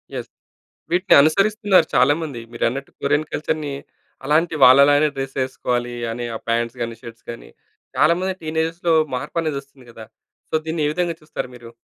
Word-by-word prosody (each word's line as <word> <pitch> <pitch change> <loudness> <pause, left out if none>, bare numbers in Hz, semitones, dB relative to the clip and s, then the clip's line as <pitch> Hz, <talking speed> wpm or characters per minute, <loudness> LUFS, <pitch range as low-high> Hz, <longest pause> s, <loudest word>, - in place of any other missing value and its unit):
Yes! - - -6 0.6
వీటిని 185 +2 +3
అనుసరిస్తున్నారు 200 +5 +3
చాలామంది. 145 -4 +2
మీరన్నట్టు 125 +4 -2
కొరియన్ 145 +2 0
కల్చర్‌ని 150 -1 -2 0.5
అలాంటి 160 +3 +2
వాళ్ళలానే 140 +3 +6
డ్రెస్ 135 0 -5
ఎసుకోవాలి 120 -2 -3 0.2
అని, 120 +1 -5
ఆ - - -3
పాంట్స్ 115 +1 -1
గాని, 115 0 -4
షర్ట్స్ 115 -2 -12
గాని, 115 - -10 0.5
చాలామంది 185 +4 +2
టీనేజర్‌లో 160 +2 -1 0.2
మార్పు 125 +6 -4
అనేది 155 -3 -2
వస్తుంది 135 -2 -21
కదా. 115 -1 -11 0.5
సో, - - -7
దీన్ని 160 -1 -2
ఏ - - +1
విధంగా 175 0 -1
చూస్తారు 150 -4 -6
మీరు? 120 -1 -12
145 Hz, 145 wpm, -21 LUFS, 125-165 Hz, 0.6 s, వాళ్ళలానే